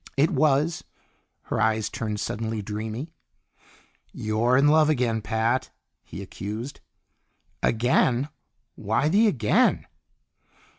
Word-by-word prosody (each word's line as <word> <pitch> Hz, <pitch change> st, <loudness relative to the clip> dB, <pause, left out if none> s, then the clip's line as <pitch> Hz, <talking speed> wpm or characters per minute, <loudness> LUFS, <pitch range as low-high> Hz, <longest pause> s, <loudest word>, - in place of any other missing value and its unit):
"It 150 Hz, +4 st, +3 dB
was." 150 Hz, +2 st, +2 dB, 0.6 s
Her 110 Hz, -, -2 dB
eyes 110 Hz, -1 st, +1 dB
turned 105 Hz, -2 st, -4 dB
suddenly 110 Hz, 0 st, -3 dB
dreamy. 110 Hz, +8 st, -5 dB, 1.0 s
"You're 110 Hz, +4 st, +1 dB
in 140 Hz, +2 st, +4 dB
love 155 Hz, 0 st, +5 dB
again, 120 Hz, -6 st, +1 dB
Pat!" 115 Hz, +4 st, 0 dB, 0.3 s
he -, -, -8 dB
accused. 110 Hz, +7 st, -7 dB, 0.8 s
"Again? 125 Hz, +3 st, +2 dB, 0.4 s
Why 110 Hz, +8 st, 0 dB
the 215 Hz, +6 st, +4 dB
'again'?" 150 Hz, -, +2 dB
120 Hz, 100 wpm, -25 LUFS, 110-145 Hz, 1.0 s, love